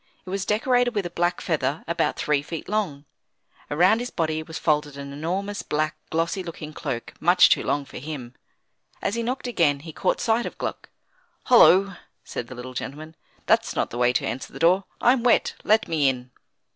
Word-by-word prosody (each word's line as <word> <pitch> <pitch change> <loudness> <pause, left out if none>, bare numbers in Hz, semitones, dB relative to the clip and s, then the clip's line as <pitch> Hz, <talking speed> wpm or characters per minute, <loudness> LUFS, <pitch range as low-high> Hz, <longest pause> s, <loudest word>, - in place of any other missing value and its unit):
It 185 - -7
was 195 0 -2
decorated 245 +2 +2
with 205 -3 0
a 175 - -4
black 175 +1 0
feather 150 -3 -1
about 170 0 0
three 150 -2 +1
feet 155 +2 -7
long. 185 -10 -2 0.6
Around 180 +9 +4
his 245 +1 -4
body 160 -5 -1
was 160 0 -7
folded 150 -3 0
an 140 0 -7
enormous 190 +7 -3
black, 155 +1 -1
glossy 165 +4 -1
looking 155 -3 -8
cloak 135 -6 -5
much 175 +3 +6
too - - +3
long 145 -1 -1
for - - -9
him. 130 -4 -7 0.7
As - - -2
he 235 - -1
knocked 250 +3 -3
again 160 - +1
he 160 0 -9
caught - - 0
sight 235 0 +1
of - - -9
Gluck. - - -5 0.5
"Hollo!" 195 -6 +6 0.3
said 120 - -6
the 130 - -9
little 125 +1 -8
gentleman, 155 +5 -6 0.3
"that's - - +2
not - - -1
the 120 - -5
way 125 0 +4
to - - 0
answer 130 - -4
the - - -10
door; 185 +4 +3
I'm 245 0 +4
wet, 240 -1 +3
let 220 +1 +3
me 155 -4 +2
in." 125 -1 -5
165 Hz, 195 wpm, -24 LUFS, 145-200 Hz, 0.7 s, much